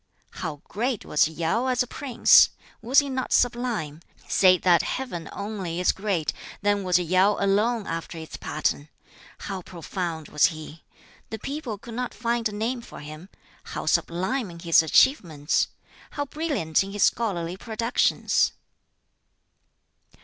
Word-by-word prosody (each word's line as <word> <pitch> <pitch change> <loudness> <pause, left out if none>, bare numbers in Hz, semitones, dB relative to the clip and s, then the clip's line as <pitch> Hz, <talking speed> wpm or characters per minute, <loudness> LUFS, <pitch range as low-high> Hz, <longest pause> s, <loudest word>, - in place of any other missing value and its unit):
"How 155 -5 -6
great 235 +2 -2
was 150 - +3
Yau 165 +10 -1
as 250 -1 +2
a - - -7
prince! 260 -3 +5 0.3
Was 250 +4 0
he 285 - +7
not 260 -1 -3
sublime! 235 -11 0 0.3
Say 185 -1 +5
that 175 -2 +4
Heaven 210 -11 -4
only 200 -5 -4
is 180 - +3
great, 190 -7 -2 0.3
then 205 -1 +2
was 180 -2 +3
Yau 185 +4 +3
alone 210 +3 +1
after 165 0 -5
its 160 -1 -8
pattern! 150 -1 -2 0.5
How 195 -2 -5
profound 170 -2 -5
was 150 - +3
he! 155 -1 -9 0.5
The 220 - -5
people 270 -2 -5
could 230 +3 -11
not 250 +1 -4
find 235 0 0
a - - -8
name 230 +4 -2
for - - -11
him. 155 +5 -10 0.3
How - - -6
sublime 190 +7 0
in 170 - -10
his 165 -1 +4
achievements! 160 - +2 0.4
How 285 - -3
brilliant 275 - 0
in 195 +1 -8
his 205 - +1
scholarly 180 -7 0
productions!" 230 +3 +1
195 Hz, 140 wpm, -25 LUFS, 165-235 Hz, 0.5 s, he